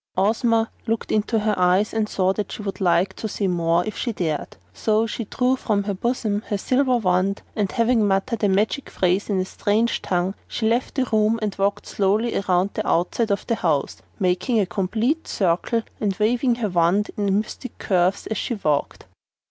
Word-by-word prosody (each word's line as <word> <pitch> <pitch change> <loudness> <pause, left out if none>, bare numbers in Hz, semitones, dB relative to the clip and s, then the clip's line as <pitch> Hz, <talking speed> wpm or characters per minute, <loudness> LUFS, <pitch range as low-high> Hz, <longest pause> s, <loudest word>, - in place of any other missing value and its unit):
Ozma 225 +3 +2 0.2
looked 225 0 -1
into 215 +2 +1
her 215 0 +1
eyes 185 +4 +3
and 220 -1 0
saw 190 0 +1
that 205 0 -4
she 210 - -6
would 195 0 -5
like 185 +1 +2
to 220 - -3
say 205 -1 -2
more 170 -1 +1
if 215 - -4
she 240 - -2
dared. 165 -8 -3 0.2
So 215 - +1
she 230 +1 -4
drew 250 +5 +1
from 210 -5 0
her 200 0 -2
bosom 215 0 -1
her 205 - -1
silver 255 +4 +2
wand, 190 -1 +1
and 205 -3 0
having 230 -2 +2
muttered 200 +3 0
a 205 - +4
magic 210 +8 0
phrase 185 +3 0
in 195 -2 +1
a 185 - 0
strange 215 +4 0
tongue, 180 +1 0
she 220 - -1
left 235 +3 0
the 265 -2 +1
room 215 +1 +3
and 210 -2 -1
walked 200 +1 0
slowly 210 +4 0
around 185 0 +1
the 215 - -3
outside 200 +6 +1
of 200 0 -1
the - - 0
house, 160 -10 0 0.2
making 185 +5 +1
a 200 - +2
complete 220 - -1
circle 195 +5 0 0.2
and 200 -3 0
waving 240 +3 +2
her 230 -3 -2
wand 180 +4 +2
in 200 -1 +1
mystic 235 +4 -7
curves 185 0 +1
as 220 - -3
she 240 - -2
walked. 150 -8 -1
205 Hz, 195 wpm, -23 LUFS, 185-225 Hz, 0.2 s, a